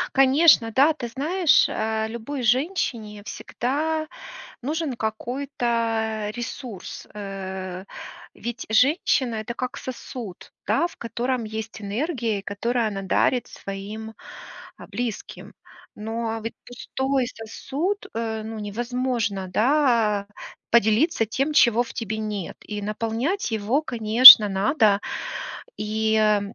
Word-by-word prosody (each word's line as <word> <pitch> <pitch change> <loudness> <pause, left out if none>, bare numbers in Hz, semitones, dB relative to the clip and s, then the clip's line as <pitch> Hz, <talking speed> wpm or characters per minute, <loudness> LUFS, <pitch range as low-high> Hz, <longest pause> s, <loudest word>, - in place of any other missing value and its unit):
Конечно, 270 -3 +5
да. 280 +7 +4
Ты 260 -6 -6
знаешь, 300 +7 +2
э, 220 0 -2
любой 235 +4 -6
женщине 235 - -1
всегда 310 +9 -3 0.5
нужен 300 +1 -3
какой-то 225 -2 -2
ресурс. 240 -3 -7
Э, 190 -2 -6 0.5
ведь 240 0 -6
женщина- 255 - +2
это 220 +2 -5
как 255 +1 -4
сосуд, 240 -6 -8
да, - - +2
в 345 - -7
котором 240 +1 -3
есть 220 0 -7
энергия, 225 0 -2
и - - -8
которую 230 +4 -1
она 200 -2 -4
дарит 235 +5 +1
своим, 210 +3 -8 0.6
а, - - -11
близким. 240 -4 -6 0.4
Но 225 +1 -4
ведь 225 - -5
пустой 265 +2 -2
сосуд, 285 - -4
э, 220 -1 -3
ну, 220 0 -6
невозможно, 230 -2 -2
да, 225 -4 +2 0.4
поделиться 230 - +3
тем, 270 +7 -2
чего 240 -5 +5
в 240 - -10
тебе 220 -1 -4
нет, 210 -4 -5
и 210 -1 -6
наполнять 230 - -2
его, 220 +6 0
конечно, 230 -3 +10
надо. 205 +1 +2 0.8
И, 220 +1 -1
э, 210 -1 +3
230 Hz, 115 wpm, -23 LUFS, 215-260 Hz, 0.8 s, конечно